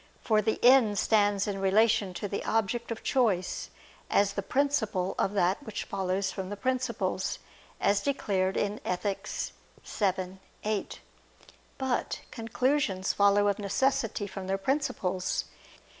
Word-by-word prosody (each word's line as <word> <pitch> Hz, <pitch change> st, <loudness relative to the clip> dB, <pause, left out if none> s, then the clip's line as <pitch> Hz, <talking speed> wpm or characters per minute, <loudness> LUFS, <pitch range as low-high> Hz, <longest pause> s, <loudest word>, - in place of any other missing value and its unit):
For 215 Hz, -2 st, +2 dB
the 220 Hz, +1 st, 0 dB
end 245 Hz, -5 st, +6 dB
stands 205 Hz, -2 st, +3 dB
in 195 Hz, -1 st, -3 dB
relation 205 Hz, -1 st, +3 dB
to 205 Hz, -, -3 dB
the 200 Hz, -, -3 dB
object 225 Hz, +2 st, 0 dB
of 230 Hz, -, -5 dB
choice, 210 Hz, -9 st, +1 dB, 0.4 s
as 200 Hz, 0 st, +3 dB
the 200 Hz, -, -2 dB
principle 220 Hz, -6 st, 0 dB
of 195 Hz, -, +1 dB
that 190 Hz, +3 st, +2 dB
which 220 Hz, -7 st, -5 dB
follows 190 Hz, 0 st, -1 dB
from 190 Hz, -2 st, -5 dB
the 205 Hz, -, -5 dB
principles, 235 Hz, -6 st, -1 dB, 0.4 s
as 200 Hz, 0 st, +2 dB
declared 195 Hz, -9 st, 0 dB
in 205 Hz, +1 st, -1 dB
Ethic. 195 Hz, +3 st, -2 dB, 0.6 s
vii, 190 Hz, -2 st, -1 dB, 0.3 s
8. 210 Hz, -1 st, -2 dB, 0.8 s
But 265 Hz, -2 st, -1 dB
conclusions 230 Hz, -4 st, 0 dB
follow 200 Hz, 0 st, +4 dB
of 200 Hz, 0 st, +1 dB
necessity 215 Hz, 0 st, 0 dB
from 195 Hz, -1 st, -7 dB
their 195 Hz, 0 st, 0 dB
principles. 195 Hz, -6 st, -1 dB
205 Hz, 130 wpm, -29 LUFS, 190-230 Hz, 0.8 s, end